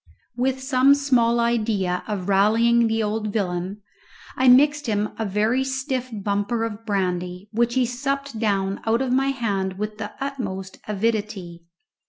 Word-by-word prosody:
With 260 Hz, +1 st, -1 dB
some 265 Hz, +1 st, +5 dB
small 245 Hz, -5 st, +2 dB
idea 215 Hz, -6 st, 0 dB
of 200 Hz, -4 st, -3 dB
rallying 225 Hz, +4 st, +4 dB
the 225 Hz, 0 st, 0 dB
old 215 Hz, 0 st, -2 dB
villain, 190 Hz, 0 st, -3 dB, 0.5 s
I 260 Hz, -, +2 dB
mixed 290 Hz, +3 st, +5 dB
him 210 Hz, -1 st, 0 dB
a 220 Hz, -, 0 dB
very 215 Hz, +6 st, +1 dB
stiff 265 Hz, -1 st, -3 dB
bumper 205 Hz, +2 st, -1 dB
of 225 Hz, 0 st, -5 dB
brandy, 180 Hz, -1 st, -2 dB
which 235 Hz, +2 st, +1 dB
he 260 Hz, -1 st, +3 dB
supped 275 Hz, 0 st, -3 dB
down 195 Hz, -3 st, 0 dB
out 230 Hz, +3 st, +2 dB
of 250 Hz, -1 st, -1 dB
my 270 Hz, +1 st, +2 dB
hand 200 Hz, -8 st, -1 dB
with 210 Hz, +1 st, -4 dB
the 210 Hz, -1 st, -5 dB
utmost 205 Hz, -10 st, -5 dB
avidity. 205 Hz, -5 st, -2 dB
225 Hz, 150 wpm, -23 LUFS, 200-255 Hz, 0.5 s, some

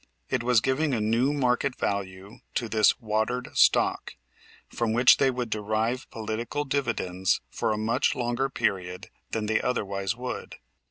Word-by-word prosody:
It 130 Hz, -3 st, +1 dB
was 120 Hz, -2 st, +3 dB
giving 135 Hz, +2 st, +1 dB
a -, -, -1 dB
new 115 Hz, +6 st, +2 dB
market 130 Hz, -2 st, +1 dB
value 100 Hz, +1 st, -4 dB, 0.2 s
to 120 Hz, -, -1 dB
this 110 Hz, 0 st, +3 dB
"watered 115 Hz, +2 st, -2 dB
stock," -, -, +3 dB, 0.5 s
from 115 Hz, -2 st, -1 dB
which 120 Hz, +2 st, +6 dB
they 135 Hz, -, +3 dB
would 125 Hz, -3 st, -3 dB
derive 110 Hz, +4 st, -1 dB
political 115 Hz, +6 st, -3 dB
dividends 110 Hz, -10 st, 0 dB
for -, -, -1 dB
a 105 Hz, -, -1 dB
much 115 Hz, +6 st, +1 dB
longer 120 Hz, +2 st, -1 dB
period 90 Hz, -7 st, -2 dB, 0.2 s
than 110 Hz, -1 st, -2 dB
they 110 Hz, 0 st, +1 dB
otherwise 100 Hz, -4 st, -1 dB
would. 125 Hz, +1 st, -6 dB
115 Hz, 150 wpm, -27 LUFS, 105-125 Hz, 0.5 s, which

